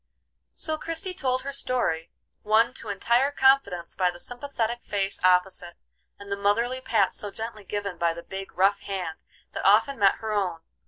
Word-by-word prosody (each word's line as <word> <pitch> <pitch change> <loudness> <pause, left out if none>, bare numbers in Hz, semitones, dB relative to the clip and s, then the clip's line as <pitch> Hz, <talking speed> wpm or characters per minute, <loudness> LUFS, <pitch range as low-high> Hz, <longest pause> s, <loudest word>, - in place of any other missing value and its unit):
So 315 -1 -2
Christie 330 +4 -3
told 260 -7 0
her 280 +1 -5
story, 200 -12 0 0.3
won 225 +3 +3
to 225 - -7
entire 235 +7 +2
confidence 265 -11 +2
by 185 -1 +2
the 175 0 -8
sympathetic 240 -1 -3
face 195 -1 -1
opposite, 180 -1 +2 0.4
and 200 0 -11
the - - +1
motherly 230 +6 +1
pats 220 -7 +1
so 205 - -3
gently 220 +1 -7
given 200 -2 -4
by 170 -1 +1
the 170 - -8
big, 195 0 -7
rough 200 +2 +4
hand 185 -6 -5 0.3
that - - -5
often 275 -4 +4
met 195 -1 +5
her 220 -1 -5
own. 180 -5 -1
205 Hz, 170 wpm, -26 LUFS, 190-255 Hz, 0.4 s, met